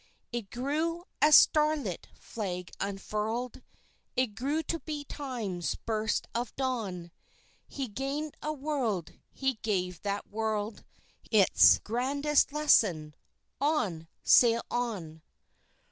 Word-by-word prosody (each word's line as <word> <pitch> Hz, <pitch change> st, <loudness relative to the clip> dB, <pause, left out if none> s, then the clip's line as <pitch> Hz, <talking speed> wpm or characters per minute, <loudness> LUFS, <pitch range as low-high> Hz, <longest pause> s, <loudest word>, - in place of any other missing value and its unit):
It 235 Hz, -5 st, -4 dB
grew, 310 Hz, +7 st, -2 dB, 0.2 s
a 300 Hz, -, +6 dB
starlit 305 Hz, 0 st, +4 dB
Flag 180 Hz, -5 st, -5 dB
unfurled! 215 Hz, +5 st, -3 dB, 0.5 s
It 250 Hz, -4 st, +1 dB
grew 285 Hz, +9 st, -1 dB
to 330 Hz, +2 st, -2 dB
be 300 Hz, 0 st, -5 dB
Time's 235 Hz, -, -4 dB
burst 220 Hz, -1 st, -2 dB
of 240 Hz, +1 st, -3 dB
dawn. 210 Hz, -10 st, -3 dB, 0.6 s
He 275 Hz, -2 st, -4 dB
gained 275 Hz, +7 st, -4 dB
a 305 Hz, -, -2 dB
World, 265 Hz, -, -2 dB, 0.2 s
he 265 Hz, -4 st, -2 dB
gave 180 Hz, -5 st, -1 dB
that 200 Hz, 0 st, -3 dB
World 215 Hz, 0 st, -2 dB, 0.5 s
Its 205 Hz, -4 st, +6 dB
grandest 280 Hz, +6 st, +1 dB
lesson 195 Hz, -, +3 dB, 0.5 s
"On! 210 Hz, -, 0 dB, 0.2 s
Sail 235 Hz, -1 st, +5 dB
on!" 195 Hz, -10 st, -3 dB
235 Hz, 105 wpm, -30 LUFS, 200-285 Hz, 0.6 s, a